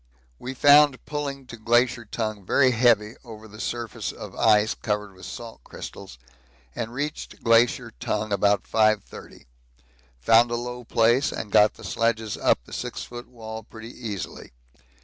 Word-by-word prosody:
We 130 +1 -6
found 145 -1 +5
pulling 140 -2 -4
to 115 - -10
Glacier 120 +1 +2
Tongue 110 -2 -4
very 130 +7 +3
heavy 115 -3 +3
over 110 -3 -11
the 105 0 -13
surface 120 -1 -4
of - - -10
ice 110 0 +4
covered 105 -2 -3
with 95 - -11
salt 115 - -9
crystals, 65 - -10 0.6
and 115 0 -4
reached 145 +5 -5
Glacier 115 +1 +3
Tongue 105 0 -2
about 100 0 +2
5.30; 110 -2 -1 0.7
found 115 - +5
a 120 - -1
low 125 +1 -5
place 120 +5 +3
and 105 - -6
got 105 +1 +5
the - - -14
sledges 115 -2 -1
up - - +1
the - - -13
6 - - -5
ft. 120 0 -9
wall 110 -2 -8
pretty 115 +1 -11
easily. 105 - -7
115 Hz, 150 wpm, -25 LUFS, 105-120 Hz, 0.7 s, found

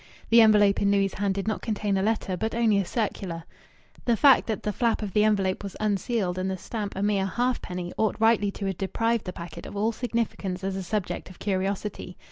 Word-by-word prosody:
The 230 0 +8
envelope 210 -2 +5
in 200 - +3
Louis' 200 -1 +2
hand 200 -1 -1
did 195 +1 -3
not 220 - -1
contain 210 -2 -1
a 190 - +1
letter, 210 -2 0
but 220 +5 -2
only 225 -4 +3
a 195 - 0
circular. 185 -5 -3 0.6
The 235 -2 +2
fact 275 0 +6
that 220 -4 -3
the 210 - -1
flap 230 0 0
of 200 -3 -5
the 210 - +4
envelope 195 -3 +1
was 200 -2 -7
unsealed 205 -2 0
and 185 +1 -1
the 190 - -2
stamp 210 +2 -5
a 195 - -2
mere 200 -2 +1
halfpenny 185 -6 -2
ought 220 -1 +2
rightly 225 -2 +3
to 200 0 -5
have 190 -2 -3
deprived 225 +4 0
the 180 - -3
packet 170 -2 -8
of - - -8
all 215 +3 +1
significance 220 -6 -3
as 195 0 -2
a 195 - -3
subject 190 +1 -3
of 185 - -13
curiosity. 195 -1 -3
200 Hz, 220 wpm, -26 LUFS, 190-220 Hz, 0.6 s, The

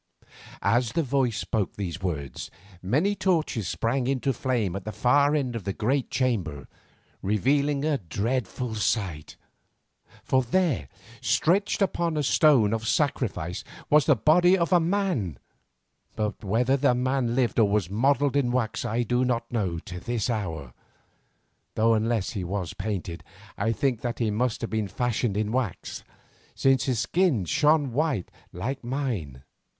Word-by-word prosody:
As 115 +3 +2
the 165 - +1
voice 130 -4 0
spoke 105 -4 -2
these 95 -2 -4
words, 75 -7 -4 0.3
many 145 - +1
torches 160 - 0
sprang 125 +6 -1
into 135 0 0
flame 115 -9 -1
at 100 - -5
the 110 - -5
far 145 +6 +3
end 130 -5 -1
of 115 - -4
the 100 +1 -2
great 130 +6 0
chamber, 90 - -1 0.5
revealing 140 +8 +1
a 150 -3 +1
dreadful 115 - -2
sight. 95 -8 -2 0.9
For 130 - +2
there, 130 - 0 0.3
stretched 195 +4 +2
upon 170 -4 -1
a 150 - +1
stone 130 -7 +4
of 110 -1 -2
sacrifice, 110 - -1 0.3
was 150 -1 +5
the 150 - +6
body 175 - +4
of 170 +1 +1
a 175 - +6
man, 170 - -1 0.8
but 105 +1 -3
whether 120 +7 +2
the 135 -2 +3
man 125 -1 0
lived 120 -3 +1
or 105 -3 +4
was 100 -3 +1
modelled 140 +5 +2
in 130 -4 +2
wax 120 -3 -1
I 115 +3 0
do 125 +2 +1
not 115 -2 -1
know 95 -8 -1
to 90 +2 -7
this 120 +3 -2
hour, 80 - -4 1.0
though 115 +1 +4
unless 110 -2 0
he 100 -4 -4
was 90 -1 -3
painted, 95 -4 -4 0.3
I 115 - 0
think 125 -1 0
that 120 -1 -3
he 115 -3 0
must 115 +2 -1
have 115 - -4
been 110 -2 -1
fashioned 120 -1 -1
in 105 0 -1
wax, 120 -7 -3 0.5
since 135 -2 +3
his 130 -3 0
skin 155 - +1
shone 150 - +3
white 140 - -1 0.2
like 125 +10 -4
mine. 115 - -3
120 Hz, 155 wpm, -26 LUFS, 105-140 Hz, 1.0 s, the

